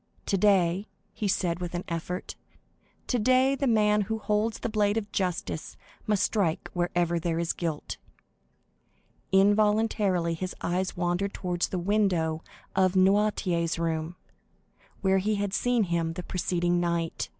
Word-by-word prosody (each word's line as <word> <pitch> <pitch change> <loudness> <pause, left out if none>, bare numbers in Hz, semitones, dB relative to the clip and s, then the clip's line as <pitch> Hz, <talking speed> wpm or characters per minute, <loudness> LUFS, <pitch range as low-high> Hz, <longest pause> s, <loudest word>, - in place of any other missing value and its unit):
"Today," 195 -1 +2 0.3
he 210 - -2
said 180 -3 0
with 175 0 -4
an 175 - -3
effort,—"today 245 +8 -2
the 275 0 -1
man 210 -2 +3
who 220 +2 -2
holds 215 +1 0
the - - -3
blade 210 -1 +1
of 205 -2 -3
justice 180 -5 -3 0.3
must 210 -2 +2
strike 185 -7 0
wherever 175 -1 0
there 165 0 -1
is 170 0 0
guilt." 160 -4 -4 1.3
Involuntarily 205 -3 +3
his 185 +2 -4
eyes 185 +2 -2
wandered 175 +3 -1
towards 175 -2 -1
the 185 - -2
window 175 -4 +1 0.3
of 185 -1 +3
Noirtier's 190 -3 +2
room, 165 0 -2 0.9
where 190 0 +3
he 210 +3 0
had 200 -1 -2
seen 245 0 +2
him 170 -3 -1
the 180 +1 -6
preceding 175 -1 0
night. 170 -1 -1
185 Hz, 130 wpm, -27 LUFS, 170-210 Hz, 1.3 s, man